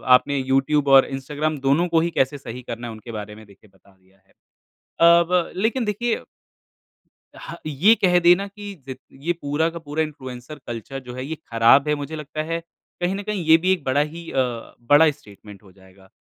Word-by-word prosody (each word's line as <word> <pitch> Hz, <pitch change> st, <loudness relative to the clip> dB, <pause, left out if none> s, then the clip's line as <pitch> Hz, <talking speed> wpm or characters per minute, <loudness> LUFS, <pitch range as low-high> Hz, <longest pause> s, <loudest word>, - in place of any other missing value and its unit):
आपने 140 Hz, +2 st, 0 dB
यूट्यूब 135 Hz, +2 st, +1 dB
और 135 Hz, -1 st, +7 dB
इंस्टाग्राम 145 Hz, +3 st, -3 dB
दोनों 165 Hz, +6 st, +3 dB
को 165 Hz, -1 st, +2 dB
ही 170 Hz, -, 0 dB
कैसे 135 Hz, 0 st, 0 dB
सही 125 Hz, -2 st, -8 dB
करना 120 Hz, 0 st, -7 dB
है, -, -, -6 dB
उनके 110 Hz, +2 st, -10 dB
बारे 105 Hz, -1 st, -7 dB
में 110 Hz, 0 st, -14 dB
देखिए 100 Hz, +1 st, -21 dB
बता 100 Hz, +1 st, -25 dB
दिया 95 Hz, +1 st, -30 dB
है। 95 Hz, -, -34 dB, 0.7 s
अ, 170 Hz, +1 st, +7 dB
ब 180 Hz, -2 st, +1 dB
लेकिन 225 Hz, +5 st, 0 dB
देखिए 225 Hz, +3 st, -1 dB, 1.2 s
ह 170 Hz, -, -8 dB
ये 165 Hz, +10 st, +4 dB
कह 180 Hz, -4 st, +3 dB
देना 175 Hz, +3 st, +4 dB
कि 205 Hz, 0 st, -9 dB, 0.2 s
ज़ 130 Hz, -, -4 dB, 0.3 s
ये 175 Hz, -, +2 dB
पूरा 145 Hz, +3 st, 0 dB
का 170 Hz, 0 st, -8 dB
पूरा 155 Hz, 0 st, -2 dB
इन्फ्लुएंसर 130 Hz, -1 st, -8 dB
कल्चर 120 Hz, +3 st, -6 dB
जो 125 Hz, -1 st, -10 dB
है, 130 Hz, -, -5 dB
ये 160 Hz, +3 st, -4 dB, 0.2 s
खराब 115 Hz, +6 st, +5 dB
है 150 Hz, -, +2 dB
मुझे 145 Hz, +2 st, -6 dB
लगता 150 Hz, 0 st, -5 dB
है, 165 Hz, +1 st, -3 dB, 0.4 s
कहीं 180 Hz, +2 st, 0 dB
न 200 Hz, -, -5 dB
कहीं 210 Hz, -4 st, -3 dB
ये 160 Hz, 0 st, +7 dB
भी 185 Hz, +3 st, +1 dB
एक 175 Hz, -6 st, -4 dB
बड़ा 135 Hz, +2 st, +1 dB
ही 165 Hz, +3 st, -6 dB
अ, -, -, -5 dB, 0.4 s
बड़ा 145 Hz, +6 st, +5 dB
स्टेटमेंट 105 Hz, -6 st, -15 dB
हो 95 Hz, -, -18 dB
जाएगा। 95 Hz, 0 st, -21 dB
145 Hz, 205 wpm, -22 LUFS, 125-170 Hz, 1.2 s, और